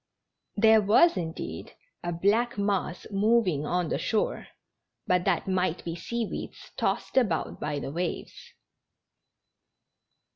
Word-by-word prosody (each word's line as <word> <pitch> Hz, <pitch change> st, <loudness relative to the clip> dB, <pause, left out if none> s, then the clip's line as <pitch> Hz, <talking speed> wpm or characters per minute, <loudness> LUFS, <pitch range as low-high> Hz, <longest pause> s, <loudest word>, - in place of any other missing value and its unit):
There 220 Hz, +1 st, +6 dB
was, 220 Hz, -, +5 dB
indeed, 165 Hz, -3 st, -5 dB, 0.3 s
a 175 Hz, -, -2 dB
black 210 Hz, +8 st, +1 dB
mass 200 Hz, -3 st, -1 dB
moving 195 Hz, -7 st, +2 dB
on 180 Hz, -2 st, 0 dB
the -, -, -1 dB
shore; 220 Hz, -2 st, -1 dB, 0.6 s
but 180 Hz, -1 st, +2 dB
that 195 Hz, -2 st, +1 dB
might 185 Hz, -2 st, 0 dB
be 165 Hz, -1 st, -3 dB
sea 235 Hz, +6 st, -3 dB
weeds -, -, -7 dB
tossed -, -, -1 dB
about 200 Hz, -11 st, +1 dB
by 150 Hz, -1 st, -2 dB
the 140 Hz, -, -4 dB
waves. 170 Hz, +3 st, -5 dB
190 Hz, 120 wpm, -27 LUFS, 170-220 Hz, 0.6 s, There